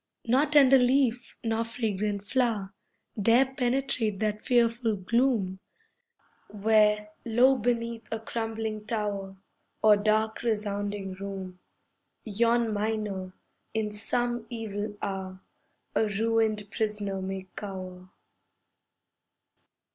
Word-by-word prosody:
Nor 260 +6 +3
tender 275 -2 +6
leaf 250 -1 +1
nor 225 0 0
fragrant 210 -3 -2
flower 215 -5 0 0.5
Dare 245 +5 +4
penetrate 250 -5 0
that 215 +1 -2
fearful 235 -2 +2
gloom, 205 -1 +1 0.9
Where, 210 0 +3
low 245 +4 +4
beneath 230 -1 -2
a 225 - -2
crumbling 225 -1 -4
tower, 200 -3 -3 0.5
Or 215 -1 +7
dark, 215 +1 +1
resounding 205 -3 -2
room, 190 -1 -7 0.6
Yon 230 +1 +1
miner, 205 -3 -2 0.4
in 215 -1 0
some 240 +2 -1
evil 210 -3 -4
hour, 190 -1 -4 0.5
A 220 - +2
ruined 215 0 0
prisoner 210 -3 -2
may 190 0 -4
cower. 185 -2 -7
215 Hz, 95 wpm, -28 LUFS, 200-235 Hz, 0.9 s, Or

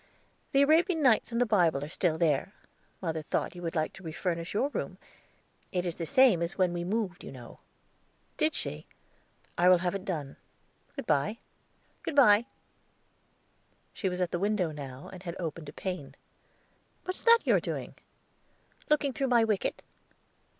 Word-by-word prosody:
"The 275 +1 +5
Arabian 320 +2 +3
Nights 240 -3 +4
and 235 - -1
the 245 - +4
Bible 175 - +2
are - - -4
still 160 0 0
there. 160 +3 +1 0.5
Mother 160 -2 -1
thought 155 - -2
you 175 - -9
would 165 -1 -4
like 155 -1 0
to - - -13
refurnish 170 +1 -3
your 260 +7 +1
room. - - -4 0.7
It 180 -2 -1
is 175 - -1
the 165 0 -4
same 255 -8 +5
as 170 +3 -2
when 185 -2 +2
we 175 0 -2
moved, 195 -1 -2
you - - -8
know." 125 -3 -11 0.8
"Did - - +1
she? 75 +1 -4 0.7
I 180 +1 +6
will 185 - +7
have 175 0 -1
it 195 -1 -4
done. 155 -8 -4 0.6
Good - - -5
by." 150 +10 +1 0.6
"Good 310 - -4
by." 235 -4 +6 1.5
She 190 - -1
was 180 0 -3
at 180 - 0
the 175 - -1
window 200 -4 +1
now, 140 -3 -8
and 185 - -9
had 170 -3 -6
opened 165 -3 -5
a - - -7
pane. 150 -6 -5 0.9
"What's 370 0 -3
that 465 0 +6
you - - +4
are - - +5
doing?" - - -5 1.0
"Looking 290 -2 +2
through 270 +3 -1
my 240 -2 +4
wicket." 215 -3 -1
180 Hz, 170 wpm, -29 LUFS, 165-225 Hz, 1.5 s, will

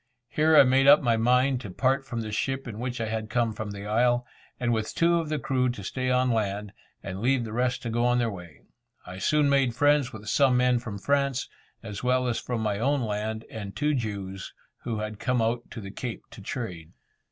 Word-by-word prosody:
Here 155 +3 +4
I - - +10
made 135 +1 +3
up 145 +1 +8
my 120 -2 +3
mind 125 +3 +2
to 105 - -7
part 135 +7 0
from 120 -2 -3
the 110 -1 -5
ship 135 +5 -2
in 110 -2 -7
which 125 0 -3
I 115 - -1
had 110 0 -3
come 115 -1 +1
from 110 0 -5
the 100 0 -7
Isle, 120 +3 +2 0.3
and 120 -1 +1
with 110 -1 -2
two 170 0 +3
of 160 -2 -4
the 155 - 0
crew 130 -2 0
to 120 -5 -5
stay 130 +6 -2
on 125 0 +2
land, 105 -2 -2 0.3
and 95 0 -5
leave 125 +1 +2
the 110 -2 -6
rest 125 +1 0
to 115 - -3
go 120 +1 0
on 125 0 +3
their 120 -2 +1
way. 85 -7 -11 0.4
I 90 +1 -8
soon 150 +6 +2
made 135 -4 +2
friends 145 -1 +3
with 110 -4 -10
some 130 +1 +3
men 125 -1 +3
from 110 -4 -6
France, 140 +3 0 0.3
as 105 -1 -7
well 125 0 +2
as 120 - 0
from 120 -2 -3
my 105 -2 -1
own 140 +4 +1
land, 110 0 -3
and 100 -3 -7
two 150 +1 +1
Jews, 100 -6 -4 0.3
who 115 -2 -2
had 105 0 -5
come 125 -1 0
out 115 +2 -1
to 120 - -8
the 100 -2 -8
Cape 120 +2 -6
to 115 -3 -11
trade. 95 -7 -6
120 Hz, 230 wpm, -27 LUFS, 110-130 Hz, 0.4 s, I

